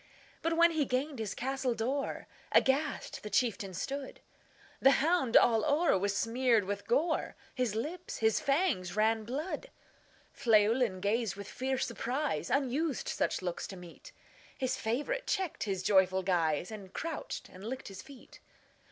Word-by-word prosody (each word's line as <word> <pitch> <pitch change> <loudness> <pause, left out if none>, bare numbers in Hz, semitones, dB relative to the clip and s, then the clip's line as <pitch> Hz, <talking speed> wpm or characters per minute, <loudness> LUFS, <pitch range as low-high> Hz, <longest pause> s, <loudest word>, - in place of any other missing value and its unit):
But, 330 0 0
when 340 0 +6
he 315 -2 +1
gained 265 +1 -2
his 215 -3 -3
castle 265 -1 -1
door, 265 +6 -2 0.3
Aghast 280 +3 +1
the 210 - -6
chieftain 205 -3 0
stood; 270 +8 -4 0.6
The 270 - +6
hound 300 -5 +3
all 225 -2 +5
o'er 310 - +3
was 200 +1 0
smeared 235 -1 +2
with 200 +1 -4
gore, 315 +7 +1 0.2
His 250 -5 -1
lips, 320 +10 -4
his 220 -1 +2
fangs, 275 - +1
ran 220 +1 +2
blood. 305 - -4 0.7
Llewelyn 220 -2 +3
gazed 215 +1 0
with 200 0 -8
fierce 260 +3 -1
surprise; 255 +5 -2
Unused 280 +1 0
such - - -1
looks 175 -1 -3
to 195 - -8
meet, 180 - -12 0.5
His 260 -1 0
favorite 295 - -2
checked 380 - -1
his 190 -3 -2
joyful 190 -1 +3
guise, 175 -1 +1
And 200 -4 -9
crouched 330 -2 -5
and 185 - -12
licked 255 +4 -5
his 190 -1 -8
feet. 270 +2 -14
240 Hz, 150 wpm, -32 LUFS, 205-280 Hz, 0.7 s, when